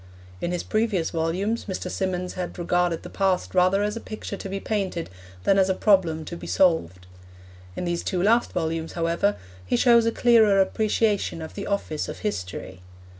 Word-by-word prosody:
In 175 - -1
his 180 - -2
previous 215 -6 0
volumes 180 +8 -1
Mr. 190 -2 -4
Symonds 185 -1 -2
had 180 -1 -5
regarded 175 -1 0
the - - -8
past 190 -2 0
rather 185 +2 +3
as 210 +1 -1
a - - -4
picture 215 -2 -6
to 195 - -7
be 195 +1 -3
painted 195 - -3 0.3
than 195 - +4
as 190 0 +3
a 190 - +2
problem 175 -7 +2
to 170 - -6
be - - -8
solved. 90 - +1 0.7
In - - -3
these 175 0 -2
two 185 - -1
last 230 +4 +3
volumes, 165 -1 -2
however, 170 +4 +1 0.3
he 90 - 0
shows 235 - +5
a - - +3
clearer 225 -5 +4
appreciation 210 -1 +1
of 160 0 -7
the 200 - -6
office 180 -7 -2
of - - -6
history. 95 - -5
185 Hz, 180 wpm, -25 LUFS, 170-205 Hz, 0.7 s, shows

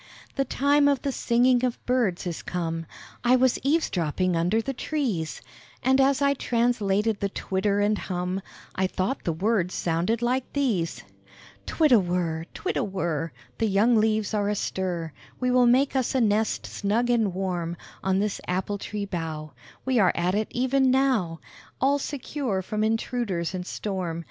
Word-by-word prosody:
The 275 - 0
time 285 +2 +3
of 280 -3 +1
the 280 - 0
singing 245 0 +2
of 250 -2 0
birds 235 -9 +1
is 175 -2 -4
come: 165 -2 -3 0.4
I 245 +1 +5
was 255 -1 +3
eaves 310 +4 +1
dropping 175 +1 0
under 175 +7 +2
the 270 +4 -2
trees; 240 - -2 0.4
And 265 +1 +4
as 275 +1 +3
I 280 0 +4
translated 225 -5 +1
the 200 - -1
twitter 200 +1 -1
and 205 +1 +2
hum, 180 +1 -3 0.3
I 190 0 +1
thought 190 +8 -2
the 170 - +1
words 185 +1 0
sounded 180 +8 0
like 250 +1 -1
these: 220 - 0 0.6
"Twirr 310 -3 +2
a 230 - +8
whirr, 175 -3 -1
twirr - - -2
a - - +1
whirr, 165 -4 -2 0.3
The 225 - +2
young 215 +4 +3
leaves 215 -1 +2
are 205 -1 +1
astir; 180 -5 -2 0.3
We 250 0 +1
will 250 -1 +5
make 265 +3 +3
us 260 0 0
a - - +3
nest 220 -1 +1
snug 225 +4 0
and 225 -5 +2
warm 175 -2 -3 0.3
On 190 0 +2
this 205 +1 -1
apple 190 +3 -1
tree 210 0 -4
bough 160 -5 -5 0.3
We 260 -2 +2
are 185 -4 +4
at 175 +2 +1
it 215 +1 -1
e'en 260 +2 +3
now 255 -11 +1 0.4
All 280 +2 +3
secure 270 -8 -3
from 215 +3 -2
intruders 220 -5 -1
and 180 -1 -4
storm. 185 -5 -3
210 Hz, 170 wpm, -26 LUFS, 180-250 Hz, 0.6 s, a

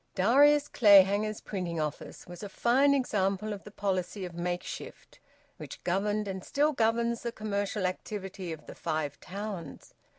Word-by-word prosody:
Darius 285 +8 +5
Clayhanger's 205 -1 +5
printing 175 -5 -4
office 150 -1 -5
was 175 -1 -10
a 205 - -6
fine 270 +7 +3
example 210 -5 0
of 200 - -8
the - - -10
policy 190 -1 -2
of 175 - -8
makeshift 175 +1 -6 0.4
which - - -9
governed 205 +3 0
and 190 -1 -5
still 295 +2 +1
governs 235 -1 +1
the 235 - -3
commercial 205 -2 -2
activity 190 -1 -4
of 155 -2 -8
the - - -9
Five 150 -2 -3
Towns. 195 -5 -7
200 Hz, 145 wpm, -29 LUFS, 185-220 Hz, 0.4 s, Darius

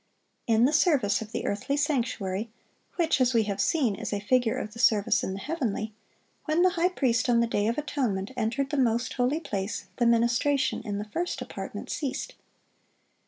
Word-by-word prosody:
In 225 +1 +4
the 290 - +2
service 275 - +3
of 220 -1 -7
the - - -3
earthly 215 +8 -1
sanctuary, 230 -8 -1 0.5
which, 325 -6 +1
as 255 -1 +3
we 225 - +5
have 200 -1 -2
seen, 270 -10 +2
is - - -5
a 205 - -1
figure 230 +2 +1
of 215 - -5
the 230 - -10
service 215 -4 +3
in 190 - -2
the 195 - -5
heavenly, 225 -7 -3 0.5
when 315 +3 +2
the 370 - +5
high 350 +1 +2
priest 250 -9 +1
on 235 -1 +4
the 235 - +3
day 210 -2 0
of 230 - 0
atonement 255 -9 -2
entered 250 +5 -1
the 295 - -1
most 240 -2 +1
holy 255 +5 +1
place, 205 - -4
the 240 - +3
ministration 235 +4 +2
in 205 -3 -4
the 205 - -4
first 340 +12 -3
apartment - - -6
ceased. 280 -4 -3
235 Hz, 190 wpm, -27 LUFS, 215-280 Hz, 0.5 s, we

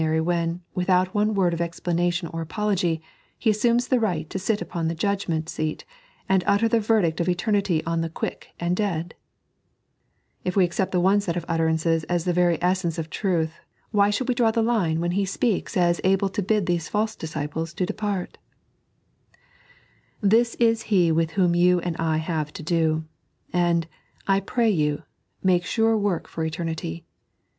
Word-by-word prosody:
ry 160 0 +1
when, 170 +1 -1
without 185 0 +2
one 210 0 +1
word 180 -3 +2
of 170 - -2
explanation 170 +1 -1
or 165 0 -4
ftpology, 175 -3 -1 0.4
He 225 - +2
assumes 235 +3 +2
the 255 - +2
right 175 -8 -1
to 190 - -3
ait 210 - 0
upon 170 -6 -3
the 165 - -2
judgment 170 -3 -1
aeat 155 -1 -3 0.4
and 190 -1 +3
utter 205 +3 +3
the 230 0 +2
verdict 205 -7 +1
of 170 - +1
eternity 180 -2 +1
on 165 0 0
the 165 - -2
quick 160 - -5
and 175 +1 0
dead 175 -5 -2 0.6
) - - -46
If 180 - -2
we 190 -2 +5
accept 175 +2 -1
the 180 - +2
one 195 +3 +4
set 175 -4 -2
of 170 - -4
utterancea 165 0 +1
as 175 -2 0
the 180 - +1
very 175 -1 +3
essence 180 -2 +1
of 160 -1 -5
truth, 170 -5 -1 0.3
why 205 -2 +4
ahonld 210 +5 -1
we 255 - +2
draw 240 -2 +3
the 225 0 +1
line 185 -9 +1
when 175 0 0
He 195 +3 +1
Bpeaks 195 +1 -1
as 175 -1 +2
able 195 +1 +2
to 205 +2 -2
bid 210 0 +1
these 170 -2 -1
false 215 +1 0
disciples 160 +1 -4
to 185 - 0
depart 205 -2 -3 1.8
1 200 - +3
This 230 +1 +3
is 230 -1 +2
He 180 -5 +4
with 165 0 +1
whom 180 -3 +3
you 180 +1 +4
and 175 -1 -3
I 160 -1 0
have 155 -2 -2
to - - -7
do; 160 -1 +1 0.5
and, 170 -2 +2 0.4
I 195 0 +3
pray 225 +3 +1
you, 150 -4 0 0.4
make 180 -2 +3
sure 225 +3 +2
work 200 -5 -1
for 160 - -4
eternity. 160 - -4
175 Hz, 185 wpm, -24 LUFS, 165-205 Hz, 1.8 s, we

